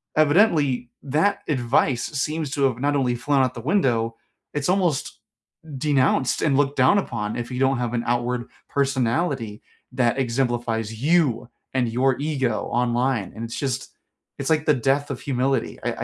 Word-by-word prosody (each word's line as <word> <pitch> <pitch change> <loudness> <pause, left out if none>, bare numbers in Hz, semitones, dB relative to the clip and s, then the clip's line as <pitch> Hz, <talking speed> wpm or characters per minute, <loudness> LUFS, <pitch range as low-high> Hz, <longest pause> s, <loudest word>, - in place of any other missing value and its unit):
Evidently, 150 - +3
that 155 +9 +1
advice 125 -2 +1
seems 150 0 -2
to 140 -1 -1
have 130 -3 +1
not 145 +2 +1
only 125 -3 +1
flown 135 +3 +1
out 130 -1 0
the 120 - -6
window, 120 - +1 0.4
it's 150 +2 -1
almost 180 -7 0 0.6
denounced 130 -2 +2
and 140 -3 +2
looked 145 0 +1
down 130 +10 +5
upon 110 - -2
if 120 +1 -5
you 125 - -3
don't 135 0 +2
have 120 -1 -2
an 120 -1 -1
outward 120 0 -1 0.2
personality 130 -3 -1 0.3
that 125 -1 +1
exemplifies 120 -3 -1
you 150 -8 +2 0.3
and 125 -3 +1
your 130 +3 +1
ego 135 -7 -1
online, 120 -2 0
and 115 - -6
it's 115 - -6
just 135 -4 -3 0.5
it's 135 - -2
like 155 -1 +2
the 150 - +4
death 140 +3 0
of 130 - -5
humility, 130 -2 -1
I - - -2
130 Hz, 160 wpm, -23 LUFS, 120-145 Hz, 0.6 s, down